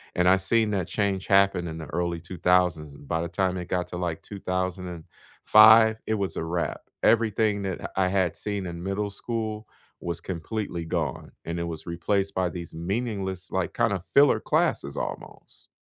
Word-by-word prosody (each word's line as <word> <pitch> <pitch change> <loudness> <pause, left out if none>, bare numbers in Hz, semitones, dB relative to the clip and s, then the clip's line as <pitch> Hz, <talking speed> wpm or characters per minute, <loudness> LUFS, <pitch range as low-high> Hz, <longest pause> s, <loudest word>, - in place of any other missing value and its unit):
And 90 0 +2
I've 95 0 +4
seen 110 +2 +2
that 95 -4 -1
change 100 -2 -1
happen 100 -3 +3
in 80 0 -6
the 80 - -6
early 85 -1 -1
2000s. 85 -4 +1
By 80 +4 -3
the 85 - -2
time 95 +1 0
it 90 - -5
got 90 -1 -1
to 90 - -5
like 85 -2 -3
2005, 95 +4 +3
it 110 - +1
was 100 -2 -2
a - - -2
wrap, 85 +1 -2 0.2
everything 110 -2 +3
that 95 -2 -4
I 95 -1 +2
had 95 -4 +1
seen 100 -2 -3
in 85 0 -6
middle 100 +2 -2
school 110 0 -4 0.3
was 85 -1 -3
completely 90 0 -4
gone, 80 -2 -3
and 85 +1 -3
it - - -1
was 80 -2 -6
replaced 95 +4 -1
by 90 -1 +1
these 85 -1 -8
meaningless, 95 0 -3
like 95 -2 -1
kinda, 100 -6 0
filler 145 0 +6
classes - - 0
almost. - - -7
95 Hz, 170 wpm, -26 LUFS, 85-100 Hz, 0.3 s, filler